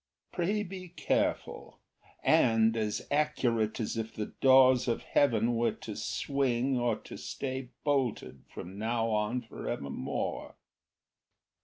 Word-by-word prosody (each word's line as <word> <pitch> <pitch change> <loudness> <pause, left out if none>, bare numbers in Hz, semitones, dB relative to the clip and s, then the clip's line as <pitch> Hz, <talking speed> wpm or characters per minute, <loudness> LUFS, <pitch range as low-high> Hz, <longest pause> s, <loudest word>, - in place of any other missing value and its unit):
Pray 200 +4 0
be 185 -1 -8
careful, 175 - -2 0.5
and 115 0 +4
as 105 -2 -2
accurate 125 -7 +1
as 110 0 -2
if 110 0 -3
the 105 - -2 0.2
doors 130 -1 +6
of 115 - -1
heaven 120 -4 +2
Were 115 +1 +1
to 105 - -8
swing 130 +3 0
or 120 -2 +1
to - - -9
stay 130 -2 -5
bolted 125 - -1
from 95 +3 -8
now 115 +1 0
on 105 +4 0
for 115 - -7
evermore." 70 -1 -4
120 Hz, 125 wpm, -30 LUFS, 110-135 Hz, 0.5 s, doors